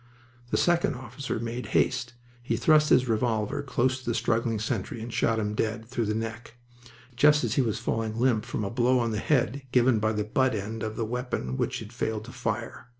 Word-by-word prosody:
The - - +1
second 175 -4 +2
officer 125 0 -5
made 115 +2 -4
haste. 125 -2 +1 0.3
He 120 - -1
thrust 155 -1 +4
his 130 0 +5
revolver 110 +1 0
close 130 -1 0
to 130 - -15
the 120 - 0
struggling 115 -1 +1
sentry 110 +1 -3
and 115 +1 -6
shot 115 -1 +2
him 105 -1 -1
dead, 110 +1 -2
through 120 -2 -2
the 105 - 0
neck, 115 +1 -5 0.6
just 150 +4 +5
as - - 0
he 140 - +3
was 110 -4 0
falling 115 -1 -2
limp 120 -4 +2
from - - -3
a 100 - -3
blow 125 +2 +3
on 120 -2 +1
the 105 - -1
head 135 0 +1
given 125 -2 +4
by 110 +1 +1
the 105 0 -1
butt 130 +3 +1
end 110 +2 -4
of 110 0 -3
the 115 - -1
weapon 125 - -3
which - - -1
had 110 +1 -10
failed 110 -2 -2
to 125 - -9
fire. 115 -1 -4
115 Hz, 210 wpm, -27 LUFS, 110-125 Hz, 0.6 s, his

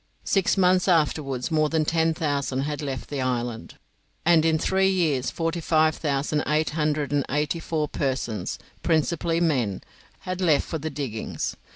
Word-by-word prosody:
Six 195 0 +2
months 185 0 +3
afterwards 150 -5 +1
more 155 -1 +2
than 160 -1 +1
ten 160 0 +1
thousand 140 -4 -1
had 150 +2 -3
left 135 -3 -4
the 140 -2 -2
island, 120 -2 -3 0.5
and 165 -1 +5
in 160 -1 +3
three 190 +4 +2
years 160 -9 +1
forty 165 +1 -2
five 155 0 +3
thousand 145 0 -1
eight 155 +1 +1
hundred 150 -1 0
and 145 -1 +2
eighty 150 +3 0
four 155 -2 -1
persons, 130 -9 -2 0.2
principally 165 +1 +1
men, 130 - 0 0.4
had 185 0 -4
left 160 -5 +3
for 160 - -4
the 160 +2 -3
diggings. 135 -7 -4
155 Hz, 160 wpm, -25 LUFS, 140-165 Hz, 0.5 s, and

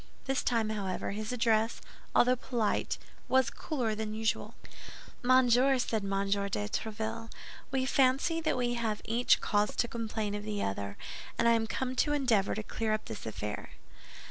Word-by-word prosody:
This 270 0 +1
time, 230 -3 +1
however, 195 -4 -2
his 215 +2 -4
address, 225 -2 +2 0.4
although 250 +1 +5
polite, 240 -4 -1 0.3
was 260 -1 +3
cooler 250 -8 -2
than 215 0 -3
usual. 220 0 -1 0.7
"Monsieur," 255 +1 +5
said 225 -4 -1
M. 195 0 0
de 200 - 0
Tréville, 220 - -3 0.4
"we 265 -1 0
fancy 270 +5 +3
that 315 - 0
we 245 -1 +1
have 225 -3 -2
each 235 +2 +3
cause 205 0 +1
to 240 - +1
complain 220 -3 -3
of 205 0 -4
the 210 -1 -2
other, 100 0 -3 0.4
and - - +3
I - - +6
am 225 -1 +2
come 255 +4 -2
to 295 - +3
endeavor 245 -9 +2
to 215 - -3
clear 220 0 -1
up 215 - -2
this 205 - -7
affair." 105 -1 -5
225 Hz, 165 wpm, -31 LUFS, 210-250 Hz, 0.7 s, I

